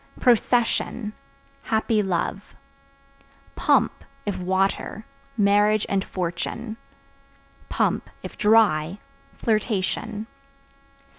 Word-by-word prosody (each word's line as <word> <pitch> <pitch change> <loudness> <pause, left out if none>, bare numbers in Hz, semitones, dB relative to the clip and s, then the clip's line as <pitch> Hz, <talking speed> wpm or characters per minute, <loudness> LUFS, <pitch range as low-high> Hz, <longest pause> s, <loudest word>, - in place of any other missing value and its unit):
Procession 240 -2 +2 0.5
Happy 220 -1 +1
love. 195 +1 -2 1.0
Pump - - +2 0.2
(If 205 -3 -2
water) 190 +4 -1 0.3
marriage 205 0 +4
and 195 -1 0
fortune; 210 +6 -4 1.5
(if - - -7
dry) 205 -6 +3 0.4
flirtation. 215 0 -1
210 Hz, 65 wpm, -24 LUFS, 190-220 Hz, 1.5 s, marriage